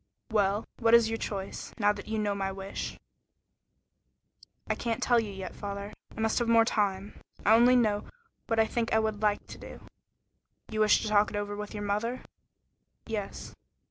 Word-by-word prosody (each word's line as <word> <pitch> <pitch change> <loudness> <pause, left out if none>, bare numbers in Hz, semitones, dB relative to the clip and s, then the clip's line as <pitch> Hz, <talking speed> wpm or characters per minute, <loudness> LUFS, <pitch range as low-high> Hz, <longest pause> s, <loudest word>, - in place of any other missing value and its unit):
"Well, 205 0 +2
what 230 0 +6
is 230 -1 +5
your 225 - -2
choice, 195 -2 -5
now 205 -2 +3
that 205 0 -9
you 220 0 -2
know 210 -1 0
my 195 -1 -2
wish?" 195 0 -5 1.7
"I - - +1
can't 230 0 -2
tell 240 -1 +4
you 220 -2 -2
yet, 190 -2 -7
father. 200 0 -6 0.2
I - - -3
must 225 +2 +2
have 240 - 0
more 230 -1 +5
time. 200 -3 -1 0.3
I 215 - +6
only 240 +2 +6
know 215 -4 +2 0.4
what 225 -1 +1
I 220 - +5
think 230 +1 -2
I - - +5
would 220 -1 -1
like 210 -1 +1
to - - -11
do." - - -10 0.9
"You 215 - -2
wish 215 0 +4
to - - -2
talk 210 0 +4
it - - -7
over 205 0 -2
with 210 +1 -6
your 205 - -4
mother?" 210 +5 -1 0.8
"Yes." 215 -3 -5
210 Hz, 185 wpm, -29 LUFS, 205-225 Hz, 1.7 s, what